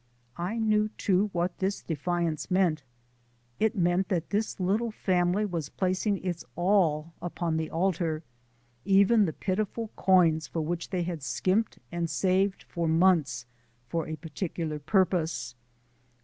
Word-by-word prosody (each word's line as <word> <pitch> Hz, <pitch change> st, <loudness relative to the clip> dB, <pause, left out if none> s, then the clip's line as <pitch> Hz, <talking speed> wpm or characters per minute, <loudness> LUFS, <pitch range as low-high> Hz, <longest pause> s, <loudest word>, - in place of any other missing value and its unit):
I 185 Hz, +7 st, -2 dB
knew 215 Hz, -1 st, +2 dB
too 200 Hz, +2 st, +2 dB
what 175 Hz, 0 st, -2 dB
this 195 Hz, +1 st, -1 dB
defiance 170 Hz, 0 st, -2 dB
meant. 180 Hz, -5 st, +2 dB, 0.8 s
It 220 Hz, +1 st, +2 dB
meant 180 Hz, 0 st, +1 dB
that 170 Hz, -4 st, -1 dB
this 210 Hz, 0 st, -1 dB
little 205 Hz, +6 st, +1 dB
family 185 Hz, -1 st, +1 dB
was 165 Hz, -7 st, -3 dB
placing 190 Hz, +1 st, -1 dB
its 175 Hz, -2 st, -2 dB
all 170 Hz, -4 st, +2 dB
upon 170 Hz, -2 st, -2 dB
the 160 Hz, -1 st, -1 dB
altar 165 Hz, -2 st, 0 dB, 0.6 s
even 200 Hz, +3 st, +5 dB
the 165 Hz, -, -1 dB
pitiful 215 Hz, +3 st, -2 dB
coins 165 Hz, -4 st, +4 dB
for 165 Hz, -, -3 dB
which 170 Hz, +2 st, -3 dB
they 180 Hz, -2 st, -1 dB
had 170 Hz, -3 st, -4 dB
skimped 190 Hz, +10 st, 0 dB
and 170 Hz, -1 st, -2 dB
saved 190 Hz, +2 st, +1 dB
for 170 Hz, -1 st, -3 dB
months 160 Hz, -7 st, +3 dB, 0.4 s
for 165 Hz, +2 st, -2 dB
a 155 Hz, -, -3 dB
particular 160 Hz, -1 st, -4 dB
purpose. 160 Hz, -, +1 dB
180 Hz, 135 wpm, -28 LUFS, 165-195 Hz, 0.8 s, even